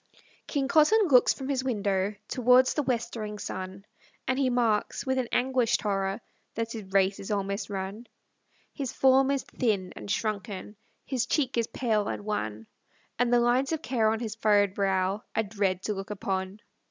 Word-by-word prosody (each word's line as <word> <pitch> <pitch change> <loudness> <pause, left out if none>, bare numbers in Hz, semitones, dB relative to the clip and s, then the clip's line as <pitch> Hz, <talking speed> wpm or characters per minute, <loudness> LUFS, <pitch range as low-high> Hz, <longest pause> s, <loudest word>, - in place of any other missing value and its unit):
KING 280 -3 -1
COTTON 350 +7 +4
looks 250 -3 +6
from 265 - -5
his 270 -2 0
window 205 -5 0
Towards 250 0 +4
the 300 - 0
westering 235 -5 -3
sun, 190 0 -6 0.4
And 260 +1 +1
he 265 -2 +2
marks, 235 -2 0
with 260 0 +1
an 250 - -1
anguished 250 -2 +1
horror, 195 0 -1 0.3
That 230 0 -2
his 210 -5 -7
race 195 0 +2
is 195 - -7
almost 200 0 -2
run. 200 +4 -5 0.7
His 270 -4 -4
form 265 0 +4
is 275 -1 0
thin 200 -7 -1
and - - -9
shrunken; 210 -1 -3 0.3
His 250 -3 -1
cheek 285 -2 0
is 230 -1 +1
pale 215 -5 0
and 205 - -4
wan; 110 - -3 0.5
And 245 -1 +2
the 245 - +5
lines 245 +4 +2
of 320 0 -3
care 230 -4 +2
on 220 0 0
his 220 -3 -3
furrowed 205 -3 +3
brow 195 0 0
Are 220 - +2
dread 195 -3 -1
to 210 - -1
look 195 +1 -6
upon. 190 0 -3
220 Hz, 175 wpm, -28 LUFS, 195-255 Hz, 0.7 s, looks